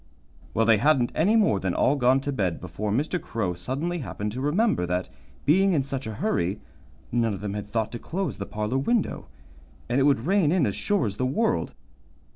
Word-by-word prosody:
Well, 115 Hz, -, +3 dB
they 110 Hz, -2 st, +5 dB
hadn't 135 Hz, -2 st, +3 dB
any 195 Hz, +8 st, +3 dB
more 205 Hz, -, +3 dB
than 95 Hz, -1 st, -2 dB
all 140 Hz, -, +3 dB
gone 130 Hz, 0 st, +3 dB
to 145 Hz, -, -2 dB
bed 95 Hz, -10 st, -1 dB
before 95 Hz, +4 st, -4 dB
Mr. 150 Hz, -, 0 dB
Crow 105 Hz, -6 st, -2 dB
suddenly 140 Hz, -, -3 dB
happened 105 Hz, -6 st, -4 dB
to 125 Hz, +4 st, -5 dB
remember 150 Hz, -, +1 dB
that, 90 Hz, +1 st, -2 dB, 0.4 s
being 190 Hz, +6 st, +4 dB
in 145 Hz, -5 st, +2 dB
such 135 Hz, -2 st, -4 dB
a 110 Hz, -, -5 dB
hurry, 100 Hz, -, -1 dB, 0.5 s
none 115 Hz, -3 st, +1 dB
of 95 Hz, -, -9 dB
them 105 Hz, -1 st, -3 dB
had 105 Hz, -1 st, -5 dB
thought 110 Hz, 0 st, -1 dB
to 120 Hz, -, -6 dB
close 190 Hz, -, -3 dB
the 100 Hz, -, -4 dB
parlor 105 Hz, +5 st, -2 dB
window, 225 Hz, -, 0 dB, 0.6 s
and 120 Hz, +3 st, +1 dB
it 135 Hz, -, +4 dB
would 140 Hz, -4 st, +2 dB
rain 185 Hz, -4 st, +3 dB
in 175 Hz, -5 st, +3 dB
as 100 Hz, -, -1 dB
sure 205 Hz, -, +1 dB
as 100 Hz, -2 st, -3 dB
the 130 Hz, -, 0 dB
world. 220 Hz, -, 0 dB
130 Hz, 210 wpm, -26 LUFS, 105-155 Hz, 0.6 s, they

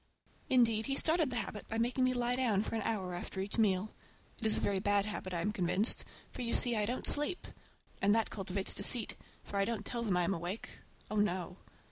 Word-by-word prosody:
Indeed, 230 Hz, -4 st, +3 dB
he 275 Hz, -, 0 dB
started 320 Hz, 0 st, +2 dB
the 250 Hz, -, -4 dB
habit 210 Hz, -2 st, -4 dB
by 225 Hz, -, -3 dB
making 240 Hz, +3 st, 0 dB
me 255 Hz, 0 st, +1 dB
lie 245 Hz, 0 st, 0 dB
down 225 Hz, -6 st, +1 dB
for -, -, -6 dB
an 225 Hz, -, -1 dB
hour 195 Hz, -4 st, -2 dB
after 175 Hz, +2 st, -6 dB
each 200 Hz, +4 st, -3 dB
meal. 205 Hz, -1 st, +1 dB, 0.5 s
It 220 Hz, -, -1 dB
is 215 Hz, -, +5 dB
a -, -, 0 dB
very 200 Hz, -1 st, 0 dB
bad 205 Hz, 0 st, +2 dB
habit, 210 Hz, -3 st, -5 dB
I 170 Hz, -2 st, -2 dB
am 210 Hz, -, 0 dB
convinced, 190 Hz, +3 st, +1 dB, 0.3 s
for, -, -, -7 dB
you 235 Hz, -1 st, -1 dB
see, 240 Hz, -2 st, +4 dB
I 210 Hz, -1 st, 0 dB
don't 250 Hz, +2 st, -3 dB
sleep. 295 Hz, +5 st, +2 dB, 0.6 s
And 205 Hz, +2 st, +4 dB
that 225 Hz, -1 st, +1 dB
cultivates 195 Hz, -1 st, 0 dB
deceit, 235 Hz, -4 st, +4 dB, 0.3 s
for 200 Hz, -, -5 dB
I 195 Hz, -, +2 dB
don't 220 Hz, -2 st, -3 dB
tell 235 Hz, -, -3 dB
them 200 Hz, -6 st, 0 dB
I'm 180 Hz, +2 st, +1 dB
awake,—oh, 190 Hz, +4 st, -7 dB
no! 185 Hz, -3 st, 0 dB
215 Hz, 215 wpm, -33 LUFS, 195-235 Hz, 0.6 s, is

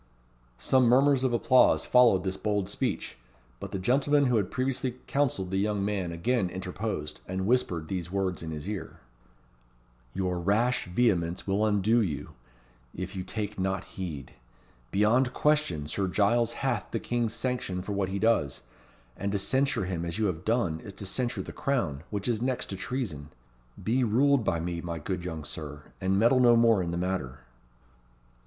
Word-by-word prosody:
Some 130 Hz, -, +3 dB
murmurs 135 Hz, +2 st, +4 dB
of 130 Hz, -, +2 dB
applause 125 Hz, +2 st, +4 dB
followed 120 Hz, -7 st, +5 dB
this 95 Hz, -1 st, -1 dB
bold 105 Hz, -2 st, -1 dB
speech; 100 Hz, -, -3 dB, 0.4 s
but -, -, -7 dB
the -, -, -2 dB
gentleman 140 Hz, +8 st, +3 dB
who 125 Hz, -3 st, +3 dB
had 100 Hz, -4 st, 0 dB
previously 130 Hz, -1 st, -1 dB
counselled 120 Hz, -10 st, 0 dB
the 95 Hz, -, 0 dB
young 100 Hz, -1 st, 0 dB
man 100 Hz, -4 st, -1 dB
again 95 Hz, +4 st, 0 dB
interposed, 90 Hz, -4 st, -4 dB
and 95 Hz, +1 st, -2 dB
whispered 95 Hz, -9 st, +1 dB
these 90 Hz, -2 st, -4 dB
words 95 Hz, -2 st, -1 dB
in 80 Hz, -, -5 dB
his 75 Hz, +2 st, -6 dB
ear: 105 Hz, -1 st, -6 dB, 1.1 s
"Your 90 Hz, -2 st, -1 dB
rash 110 Hz, +8 st, +1 dB
vehemence 90 Hz, -4 st, +1 dB
will 100 Hz, +2 st, +1 dB
undo 110 Hz, +2 st, +3 dB
you, 75 Hz, -6 st, -3 dB, 0.6 s
if 95 Hz, +2 st, -5 dB
you 95 Hz, -, -3 dB
take 105 Hz, 0 st, -4 dB
not 95 Hz, 0 st, -1 dB
heed. 80 Hz, -8 st, -7 dB, 0.6 s
Beyond 120 Hz, -, +2 dB
question, 150 Hz, -, +1 dB
Sir 95 Hz, +6 st, -1 dB
Giles 115 Hz, +5 st, +2 dB
hath 130 Hz, -3 st, -1 dB
the -, -, -2 dB
king's 120 Hz, -2 st, -1 dB
sanction 115 Hz, -7 st, -2 dB
for 105 Hz, -, -5 dB
what 100 Hz, -2 st, -1 dB
he 95 Hz, -, -2 dB
does, 100 Hz, -, +1 dB, 0.5 s
and 100 Hz, 0 st, -3 dB
to -, -, +2 dB
censure 130 Hz, +2 st, +1 dB
him 90 Hz, -2 st, -3 dB
as 85 Hz, +2 st, -4 dB
you 110 Hz, -, +1 dB
have 90 Hz, -4 st, -2 dB
done 95 Hz, -8 st, +1 dB
is 100 Hz, -, -10 dB
to 100 Hz, -, -8 dB
censure 120 Hz, +5 st, -2 dB
the -, -, -8 dB
Crown, 95 Hz, -, -1 dB
which 100 Hz, 0 st, -3 dB
is 115 Hz, -2 st, 0 dB
next 125 Hz, -3 st, -1 dB
to -, -, -3 dB
treason. 95 Hz, -, -4 dB, 0.5 s
Be 125 Hz, +4 st, +2 dB
ruled 130 Hz, +3 st, +3 dB
by 85 Hz, -, 0 dB
me, 85 Hz, 0 st, -3 dB
my 85 Hz, -1 st, -4 dB
good 90 Hz, +3 st, -4 dB
young 80 Hz, -3 st, -5 dB
Sir, 75 Hz, -1 st, -7 dB, 0.2 s
and 95 Hz, +1 st, +1 dB
meddle 120 Hz, +5 st, +4 dB
no 120 Hz, -2 st, +6 dB
more 115 Hz, -3 st, +5 dB
in 85 Hz, -, -2 dB
the 85 Hz, -, -2 dB
matter." 90 Hz, -9 st, -3 dB
100 Hz, 175 wpm, -28 LUFS, 90-120 Hz, 1.1 s, no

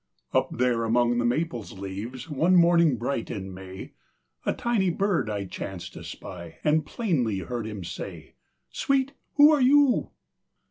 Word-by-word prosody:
Up -, -, +2 dB
there 120 Hz, -2 st, +2 dB
among 120 Hz, +1 st, +2 dB
the 120 Hz, -, +1 dB
maple's 120 Hz, -3 st, -1 dB
leaves, 100 Hz, +8 st, -6 dB
One 165 Hz, +5 st, +2 dB
morning 170 Hz, -5 st, +5 dB
bright 120 Hz, 0 st, -2 dB
in 95 Hz, -2 st, -5 dB
May, 95 Hz, 0 st, -9 dB, 0.6 s
A -, -, +4 dB
tiny 225 Hz, -6 st, +1 dB
bird 185 Hz, -, 0 dB
I 100 Hz, -2 st, -2 dB
chanced 95 Hz, -1 st, -7 dB
to -, -, -9 dB
spy, 85 Hz, -2 st, -9 dB
And 155 Hz, 0 st, +2 dB
plainly 135 Hz, -, 0 dB
heard 115 Hz, +3 st, -4 dB
him 105 Hz, -4 st, -6 dB
say: -, -, -7 dB, 0.4 s
"Sweet, 275 Hz, 0 st, +1 dB, 0.2 s
who 295 Hz, +1 st, +8 dB
are 295 Hz, -3 st, +3 dB
you?" 275 Hz, 0 st, +4 dB
125 Hz, 150 wpm, -26 LUFS, 105-175 Hz, 0.6 s, who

